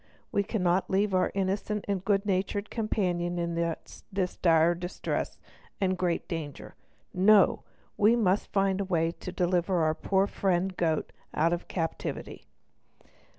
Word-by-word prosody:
We 205 - +2
cannot 190 -3 0
leave 195 +1 +1
our 185 - +3
innocent 200 +2 -1
and 195 -2 -1
good 200 0 +1
natured 200 +1 -1
companion 180 -6 -1
in 170 0 -1
this 170 +3 -3
dire 165 -1 +4
distress 175 +1 -3 0.4
and 185 -1 +1
great 180 -2 -1
danger. 155 -5 -6 0.4
No! 200 +2 +5 0.4
we 215 +3 +5
must 205 -4 +1
find 195 -1 +1
some 195 - -2
way 165 -3 +1
to 180 - -8
deliver 180 -1 +1
our 155 0 +2
poor 190 +4 +1
friend 190 -1 0
goat 160 -3 0 0.2
out 165 +3 +3
of 175 - -4
captivity." 165 -3 -4
185 Hz, 140 wpm, -28 LUFS, 175-200 Hz, 0.4 s, No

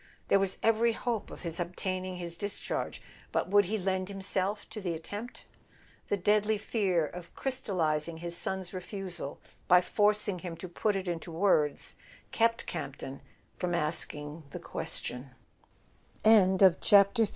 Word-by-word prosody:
There 200 - +5
was 195 -1 0
every 225 +1 +4
hope 230 -1 -2
of - - -10
his 170 0 -3
obtaining 185 +1 -3
his 170 -1 -4
dis¬ 200 +3 -3
charge; - - -3 0.3
but - - 0
would 205 0 +6
he 215 +5 -1
lend 190 -1 -1
himself 195 +1 -1
to 220 -1 -6
the 175 -3 -2
attempt? 205 +9 -7 0.6
The 205 - +2
deadly 210 +3 +3
fear 195 -6 +1
of 170 +2 -9
crystallizing 170 - -1
his 170 +1 -3
son's 190 +1 -1
refusal 180 -5 -5 0.3
by 180 0 +7
forcing 205 0 +2
him 170 -2 -6
to 185 - -6
put 205 +4 0
it 190 -1 -3
into 170 -1 -3
words 160 -4 +1 0.4
kept 230 0 +2
Campton 135 -4 -5 0.4
from 175 -1 0
ask 155 0 0
185 Hz, 130 wpm, -30 LUFS, 170-205 Hz, 0.6 s, by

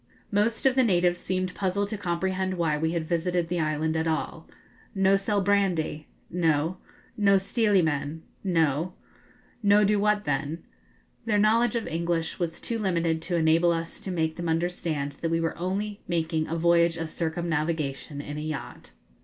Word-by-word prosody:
Most 215 +4 +1
of 265 - +5
the 260 - +4
natives 175 -4 +2
seemed 185 0 -2
puzzled 200 +1 -1
to 215 - -3
comprehend 185 0 -1
why 165 -3 +1
we 160 +2 -1
had 165 -2 -2
visited 170 0 0
the 175 0 -1
island 155 0 0
at 160 0 0
all. 160 -1 -3 0.5
'No 195 0 +4
sell 200 +1 +1
brandy?' 185 -6 +1 0.2
'No.' 165 0 +1 0.4
'No 200 -2 +4
stealy 200 -1 +2
men?' 155 +1 -2 0.2
'No.' 165 -2 +1 0.7
'No 205 0 +5
do 205 0 +3
what 210 0 +2
then?' 145 +2 -2 0.6
Their 215 -2 +2
knowledge 225 +4 +3
of 230 - -1
English 165 0 -2
was 170 -2 -2
too 230 -1 -3
limited 170 -5 0
to 175 - -2
enable 165 +1 +4
us 165 0 -3
to - - -7
make 160 -3 -1
them 170 -1 -3
understand 160 -3 -1
that 165 - 0
we 165 0 +1
were 165 0 -1
only 200 +4 -3
making 160 -2 0
a 165 - -2
voyage 170 0 +3
of 165 -1 -4
circumnavigation 160 -4 -2
in 145 +1 -6
a - - -4
yacht. 155 -3 -6
170 Hz, 170 wpm, -27 LUFS, 160-195 Hz, 0.7 s, of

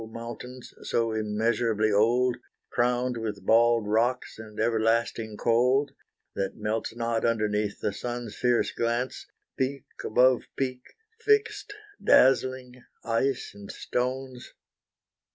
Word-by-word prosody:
mountains, 120 +2 -8
so 115 -1 0
immeasurably 110 0 0
old, 120 +5 +3 0.4
Crowned 125 0 +1
with 105 -4 -5
bald 115 0 +4
rocks 115 +3 0
and 110 -1 -10
everlasting 115 -1 0
cold, 125 +4 +2 0.4
That 95 -1 -3
melts 110 +1 -2
not 115 -1 -1
underneath 105 -3 0
the 100 - -1
sun's 120 +1 -5
fierce 125 -1 +1
glance, 120 +2 -2 0.3
Peak 135 0 -1 0.2
above 125 +2 +3
peak, 130 -2 -2 0.4
fixed, 430 -1 +1 0.3
dazzling, 130 -1 +3 0.2
ice 120 +4 0
and 100 -1 -10
stones. 130 0 -4
120 Hz, 105 wpm, -27 LUFS, 110-125 Hz, 0.4 s, bald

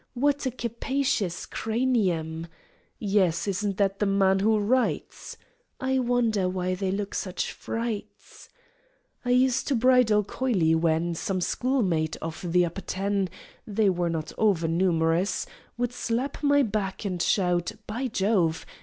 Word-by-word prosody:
"What 285 +2 +1
a - - +2
capacious 235 -5 -2
cranium!" 190 -9 -1 0.5
"Yes; 195 -4 +1
isn't 200 0 -1
that 195 -1 +1
the 205 - +1
man 195 -1 +3
who 215 +2 +3
writes?" 240 +5 -1 0.4
"I 265 0 +1
wonder 235 -6 +1
why 185 0 -1
they 190 +1 -2
look 200 +1 -3
such 185 -2 -3
frights!" 225 -2 -6 0.7
I 245 - -3
used 250 0 +3
to 280 - +2
bridle 240 -3 +4
coyly 195 -8 +1
when 165 +1 +1
Some 185 +3 -2
schoolmate, 180 - 0
of 165 +2 -6
the 180 0 +4
Upper 175 +3 -5
Ten 195 0 -1 0.4
(They 210 -1 +2
were 175 -1 -1
not 160 -2 -3
over 195 -7 +2
numerous!), 165 +1 +1 0.3
Would 245 0 -1
slap 250 +3 -2
my 285 -1 +4
back, 210 -3 -2
and 180 -3 -2
shout 175 -3 +1
"By 245 +5 -3
Jove! 190 -7 +1
200 Hz, 135 wpm, -26 LUFS, 180-240 Hz, 0.7 s, bridle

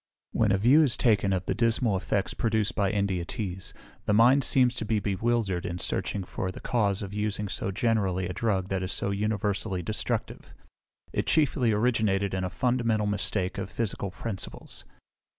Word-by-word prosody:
"When 110 -3 +2
a 95 - +3
view 125 +10 +5
is 140 -7 +2
taken 105 -4 +3
of 95 -1 -1
the - - 0
dismal 115 -2 +2
effects 95 0 -1
produced 110 -3 0
by 100 -2 +1
India 100 -3 0
teas, 95 0 -5 0.4
the 105 - +3
mind 125 +5 +6
seems 125 0 +3
to - - -2
be 110 0 0
bewildered 100 -2 0
in 85 - -3
searching 100 +2 -2
for 90 0 -4
the - - -10
cause 105 -5 0
of 100 0 -7
using 105 0 -2
so 95 - -3
generally 95 -4 0
a 90 - -4
drug 95 -2 -1
that 95 -1 -1
is 95 0 -3
so 100 - -2
universally 100 -2 -1
destructive. 110 +5 -3 0.6
It - - -1
chiefly 140 -6 +2
originated 105 -3 +1
in 95 -1 -1
a 90 - -1
fundamental 115 +2 +1
mistake 100 -2 -1
of 95 - -4
physical 105 -3 -3
principles. 95 0 -6
105 Hz, 175 wpm, -27 LUFS, 95-115 Hz, 0.6 s, mind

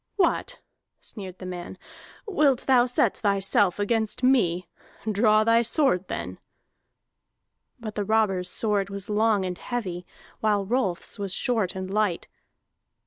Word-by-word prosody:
"What," 420 +6 0 0.4
sneered 190 -4 -8
the 185 - -9
man, 180 0 -7 0.5
"wilt 300 - +2
thou 250 -2 +4
set 250 - +1
thyself 200 -2 +2
against 220 +3 0
me? 185 -10 +2 0.4
Draw 215 0 +3
thy 230 +1 +4
sword, 230 - +1
then!" - - -5 1.4
But 220 -2 -6
the 205 - -2
robber's 195 -4 +1
sword 205 -2 -1
was 200 +1 -6
long 210 -2 +2
and 180 -1 -4
heavy, 185 -8 -4 0.3
while 210 -2 +1
Rolf's 210 -5 -1
was 195 -2 -2
short 220 -7 0
and 190 0 -4
light. 210 -5 0
210 Hz, 130 wpm, -25 LUFS, 190-230 Hz, 1.4 s, thou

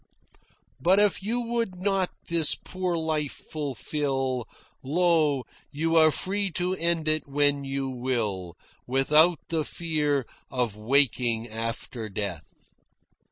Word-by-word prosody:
"But 185 +8 +4
if 205 -2 +3
you 230 +5 -1
would 230 -4 -2
not 190 0 0 0.2
this 165 -2 +4
poor 185 -2 -3
life 155 -3 -1 0.2
fulfil, 135 -3 -2 0.3
Lo, 155 -2 +2 0.3
you 165 +3 -1
are 160 -1 +7
free 195 +6 -1
to 180 0 0
end 170 -3 0
it 155 -1 +1
when 145 0 +2
you 135 0 -2
will, 115 -9 -2 0.3
Without 150 +6 +5
the 160 -2 0
fear 150 -4 -1 0.2
of 125 -5 -1
waking 120 0 +2
after 115 0 -4
death." 100 -5 -5
145 Hz, 115 wpm, -26 LUFS, 130-170 Hz, 0.3 s, are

